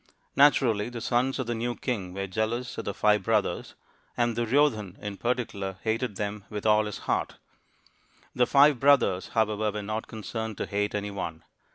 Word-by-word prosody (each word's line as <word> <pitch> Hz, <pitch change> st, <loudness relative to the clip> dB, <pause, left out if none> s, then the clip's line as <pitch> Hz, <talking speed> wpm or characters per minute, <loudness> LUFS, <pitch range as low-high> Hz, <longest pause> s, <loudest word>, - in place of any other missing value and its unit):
Naturally, 120 Hz, -7 st, +4 dB
the 120 Hz, -1 st, -6 dB
sons 125 Hz, +3 st, 0 dB
of 130 Hz, -, -2 dB
the 120 Hz, -, -2 dB
new 120 Hz, +1 st, -2 dB
king 105 Hz, -9 st, -3 dB
were 100 Hz, 0 st, -2 dB
jealous 110 Hz, +5 st, -2 dB
of -, -, -5 dB
the 100 Hz, -, -2 dB
five 105 Hz, -1 st, +3 dB
brothers; 105 Hz, +1 st, -1 dB, 0.4 s
and 120 Hz, -1 st, +1 dB
Duryodhan, 115 Hz, -5 st, +1 dB
in 105 Hz, -1 st, -5 dB
particular, 110 Hz, -5 st, -2 dB
hated 110 Hz, 0 st, -1 dB
them 105 Hz, 0 st, -4 dB
with_dl 105 Hz, 0 st, +2 dB
JikJlfiart. 105 Hz, -, -2 dB, 1.0 s
The 125 Hz, -1 st, +2 dB
five 140 Hz, -1 st, +5 dB
brothers, 130 Hz, -10 st, +4 dB
""however, 110 Hz, -1 st, +1 dB
were 105 Hz, -1 st, -4 dB
not 110 Hz, +2 st, -4 dB
concerned 110 Hz, 0 st, -5 dB
to -, -, -2 dB
hate 105 Hz, +1 st, -1 dB
any 105 Hz, 0 st, -3 dB
one. 85 Hz, -5 st, -5 dB
110 Hz, 165 wpm, -27 LUFS, 105-120 Hz, 1.0 s, five